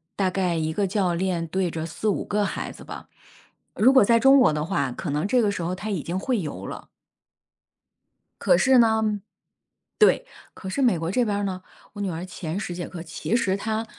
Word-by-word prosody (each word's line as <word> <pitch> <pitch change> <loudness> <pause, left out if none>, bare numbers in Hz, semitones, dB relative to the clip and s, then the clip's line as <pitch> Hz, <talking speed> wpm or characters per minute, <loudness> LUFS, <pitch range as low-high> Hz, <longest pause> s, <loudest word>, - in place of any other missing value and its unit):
大 190 -2 +1
概 180 -2 0
1 160 0 -1
个 200 +2 0
教 185 -2 0
练 170 -1 -1
对 185 +1 -1
着 160 0 -4
4-5 200 +5 -2
个 210 0 0
孩 - - -4
子 - - -12
吧。 - - -9 0.7
如 255 +5 +5
果 260 - +7
在 230 +1 +4
中 270 +3 +6
国 250 - +5
的 150 0 -2
话， 140 -8 -1
可 - - -5
能 150 +5 -1
这 245 +3 +3
个 210 - +2
时 200 - -4
候 175 +2 -2
她 205 +3 -6
已 185 -8 -2
经 175 +3 -3
会 245 +2 0
游 160 -5 -6
了。 - - -8 1.5
可 - - +4
是 265 -1 +4
呢 220 -2 +2 0.8
对， 430 +3 +4 0.3
可 190 - -9
是 275 +9 -2
美 235 -9 +3
国 165 +2 -3
这 245 +3 +2
边 205 -2 -1
儿 205 - -2
呢， 185 -2 -3 0.3
我 205 - -7
女 200 - -1
儿 170 +1 -5
前 180 -1 -5
10 180 -4 -4
节 175 0 -5
课 170 -3 -8
其 170 +7 -3
实 195 -5 +1
她 220 +2 -2
190 Hz, 220 characters per minute, -24 LUFS, 170-220 Hz, 1.5 s, 果